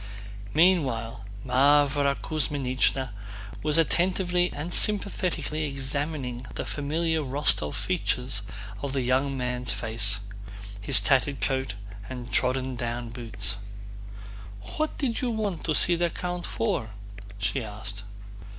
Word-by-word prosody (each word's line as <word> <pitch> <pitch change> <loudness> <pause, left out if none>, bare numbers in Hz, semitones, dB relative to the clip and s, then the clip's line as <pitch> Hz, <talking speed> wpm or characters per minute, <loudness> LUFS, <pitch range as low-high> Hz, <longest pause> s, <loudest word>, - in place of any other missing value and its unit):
Meanwhile, 130 - +2 0.2
Mávra 140 +2 +4
Kuzmínichna 135 -3 0 0.5
was 150 +1 +1
attentively 180 +2 +2
and 160 +5 -3
sympathetically 185 -6 +2
examining 135 -2 -2
the - - -3
familiar 160 +3 -1
Rostóv 135 - +1
features 130 - -1 0.4
of 140 -1 -3
the 135 - 0
young 135 +2 +1
man's 125 -1 -1
face, 105 -4 +1 0.6
his 105 - +7
tattered 135 0 +2
coat 130 -5 -1 0.3
and 125 -2 -7
trodden 130 0 +2
down 120 -1 -3
boots. 110 -4 -3 1.2
"What 310 0 -1
did 245 -5 -1
you 250 - 0
want 210 -7 -2
to 155 - +1
see 175 - +5
the 170 0 +1
count 175 +1 -4
for?" 115 0 -1 0.5
she 125 +5 -1
asked. 105 -1 -5
135 Hz, 115 wpm, -27 LUFS, 125-160 Hz, 1.2 s, his